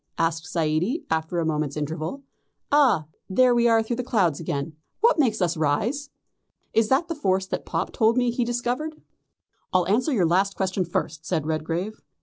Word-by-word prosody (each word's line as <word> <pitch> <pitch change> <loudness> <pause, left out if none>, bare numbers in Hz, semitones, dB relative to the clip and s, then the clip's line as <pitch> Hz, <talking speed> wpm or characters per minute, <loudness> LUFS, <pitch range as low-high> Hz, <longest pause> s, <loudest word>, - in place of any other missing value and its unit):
asked 165 0 0
Zaidie, 170 - 0
after 160 +2 -1
a 165 - +1
moment's 150 -2 -1
interval. 160 - -4 0.5
"Ah, 275 - +4 0.2
there 250 +5 +4
we 235 0 +3
are 225 -1 +4
through 230 +1 -3
the 250 - -2
clouds 190 - +1
again. 155 -1 -3 0.3
What 465 -6 +4
makes 225 -8 +2
us 175 0 +1
rise? 215 - 0 0.6
Is 225 -1 +3
that 275 +6 +2
the 330 - -2
force 190 - 0
that - - -5
Pop 165 +2 -2
told 225 +2 +3
me 245 -1 +2
he 240 +1 0
discovered?" 245 +6 -2 0.7
"I'll 180 -2 +2
answer 235 +10 +2
the 180 - +3
last 190 +4 +2
question 190 -1 -1
first," 160 -2 -3
said 155 - -1
Redgrave. 165 +6 -3
190 Hz, 175 wpm, -25 LUFS, 160-245 Hz, 0.7 s, Ah